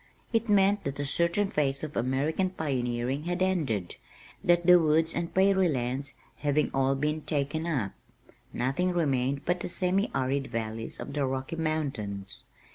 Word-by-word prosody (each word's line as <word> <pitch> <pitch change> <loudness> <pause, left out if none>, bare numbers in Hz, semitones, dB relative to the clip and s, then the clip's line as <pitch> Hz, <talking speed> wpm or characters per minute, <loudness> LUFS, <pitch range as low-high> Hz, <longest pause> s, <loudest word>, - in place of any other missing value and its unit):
It 225 0 +1
meant 200 0 +4
that 140 0 -4
a 145 - -1
certain 170 +7 +3
phase 140 -2 0
of 155 -1 -5
American 140 +9 0
pioneering 130 -4 -2
had 175 +1 0
ended, 140 - -1 0.5
that 175 0 +3
"the 180 0 +8
woods 160 +1 +2
and 170 - -2
prairie 190 -1 +4
lands" 130 +1 -2 0.2
having 150 0 +1
all 135 0 +2
been 150 +3 -1
taken 150 +2 -2
up, 125 - -1 0.6
nothing 160 +9 0
remained 140 -4 0
but 175 +1 +1
the - - -4
semi 185 +3 +1
arid 135 +1 0
valleys 115 -1 -4
of 140 - -6
the 145 -1 0
Rocky 130 +4 -3
Mountains. 135 -12 -3
150 Hz, 155 wpm, -28 LUFS, 130-175 Hz, 0.6 s, the